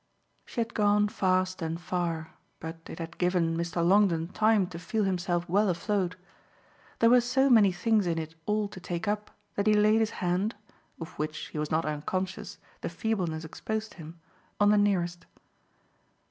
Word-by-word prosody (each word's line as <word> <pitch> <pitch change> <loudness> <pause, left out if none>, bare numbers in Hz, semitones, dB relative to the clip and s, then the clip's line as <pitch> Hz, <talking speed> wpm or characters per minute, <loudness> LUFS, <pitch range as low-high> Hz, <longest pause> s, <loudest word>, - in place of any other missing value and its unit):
She - - -6
had 230 0 -1
gone 210 0 +3
fast 185 -1 0
and 165 +1 -2
far, 170 -2 -3 0.3
but 165 +1 -6
it - - -8
had 165 0 -7
given 180 -2 +1
Mr. 170 0 -1
Longdon 180 -4 +3
time 215 0 +3
to 170 -3 -7
feel 215 +5 -1
himself 180 -2 -1
well 200 +3 +3
afloat. 180 0 -1 0.8
There 230 - +5
were 250 0 +7
so 265 +3 +2
many 210 -5 +6
things 205 +2 +1
in 165 -1 0
it 160 0 -4
all 210 0 +1
to 185 - -10
take 175 -1 -4
up 210 0 -1 0.2
that 200 +1 -1
he 215 - +5
laid 215 +1 +4
his 220 -1 +2
hand 185 +4 0 0.4
of 165 0 -6
which, 155 0 -3
he 150 - -5
was 150 0 -2
not 160 +1 +1
unconscious, 180 +5 -3 0.2
the - - -3
feebleness 175 -4 -2
exposed 220 +7 -4
him 165 0 -11 0.4
on 205 0 +5
the - - +5
nearest. 175 -4 0
185 Hz, 175 wpm, -28 LUFS, 170-210 Hz, 0.8 s, were